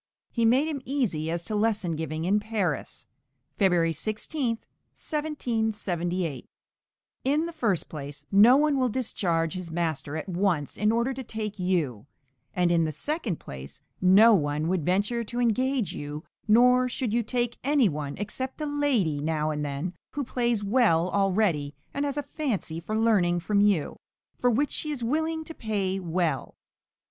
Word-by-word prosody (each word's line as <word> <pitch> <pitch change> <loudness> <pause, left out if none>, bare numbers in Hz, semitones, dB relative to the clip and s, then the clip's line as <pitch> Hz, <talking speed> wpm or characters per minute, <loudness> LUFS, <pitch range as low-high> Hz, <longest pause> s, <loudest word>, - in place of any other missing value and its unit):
He 235 -2 +1
made 260 +7 +4
him 295 -4 -3
easy 230 - -1
as 170 +1 -2
to 215 - -3
lesson 210 -4 +1
giving 160 0 -3
in 200 +3 +3
Paris 210 -7 -2 0.5
(February 175 -4 +3
16, 230 - -2 0.4
1778) 210 - -2 0.8
In 295 +5 +2
the 340 - -6
first 215 - 0
place, 145 -1 -8
no 220 +7 +7
one 295 -1 +2
will 255 -1 +2
discharge 175 -9 -1
his 185 -2 -5
master 160 -3 -2
at 160 - -5
once 175 -5 0
in 210 +1 +2
order 235 +3 +1
to 265 +1 -6
take 215 -3 -5
you; 155 - -1 0.5
and, 180 -1 +2
in 170 -1 +3
the 155 - -1
second 250 - -2
place, 70 +1 -9 0.2
no 200 +5 +7
one 150 -3 +1
would 180 -3 0
venture 205 +8 +1
to 240 +2 -5
engage 250 0 +1
you, 145 +2 -6 0.2
nor 250 +3 +5
should 240 -3 -2
you 240 - +3
take 240 +1 -2
any 280 -3 +4
one, 145 -4 -4
except 260 +7 -5
a 305 - -2
lady, 275 - +1
now 155 0 0
and 150 -1 -2
then, 145 +5 -3 0.2
who 285 - -2
plays 235 -4 0
well 200 -6 +3
already 190 -8 +1 0.2
and 280 +1 -1
has 285 0 -3
a 290 - -1
fancy 225 - -3
for 215 +6 -3
learning 195 -6 +3
from 200 +4 +1
you, 200 -7 +1 0.4
for 245 - +3
which 275 +5 +1
she 305 - -3
is 280 -5 -3
willing 320 +6 0
to 325 - -8
pay 200 -7 -1
well. 170 -6 -1
205 Hz, 165 wpm, -27 LUFS, 165-245 Hz, 0.8 s, no